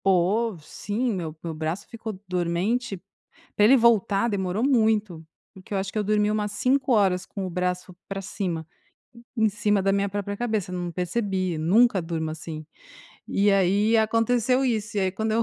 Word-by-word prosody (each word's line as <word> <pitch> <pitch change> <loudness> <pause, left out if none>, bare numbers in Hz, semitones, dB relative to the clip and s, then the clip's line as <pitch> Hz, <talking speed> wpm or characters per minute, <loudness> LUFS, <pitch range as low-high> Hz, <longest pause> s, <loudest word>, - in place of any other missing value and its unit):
Pô, 195 +3 +2
sim, 210 +9 -3
meu. 165 -5 -4
Meu 165 -1 -4
braço 160 +5 -4
ficou 220 -4 -7
dormente, 185 +6 -1 0.6
pra 210 - +5
ele 255 +5 +7
voltar 225 -3 +3
demorou 200 0 -1
muito, 215 - +1 0.3
porque 190 0 -10
eu - - +1
acho 195 0 -2
que - - -5
eu 210 - +1
dormi 210 0 +2
umas 210 -1 -1
5 255 +5 +1
horas 190 -5 +3
com 195 -1 -5
o - - -5
braço 180 0 -3
para 195 0 -4
cima, 175 -4 -4 0.7
hu 220 - +2
em - - +5
cima 210 0 +1
da 195 +1 +1
minha 200 0 +1
própria 205 0 -4
cabeça, 215 -5 -2
não 175 -1 -3
percebi, 185 0 -1
nunca 195 +5 +4
durmo 165 -1 -3
assim. 155 -1 -7 0.6
E 200 +1 +2
aí, 200 +4 +3
aconteceu 230 +3 +2
isso, 215 -4 -1
e - - +2
aí 190 -1 0
quando 220 +3 -2
eu 230 +1 +2
200 Hz, 180 wpm, -25 LUFS, 180-220 Hz, 0.7 s, ele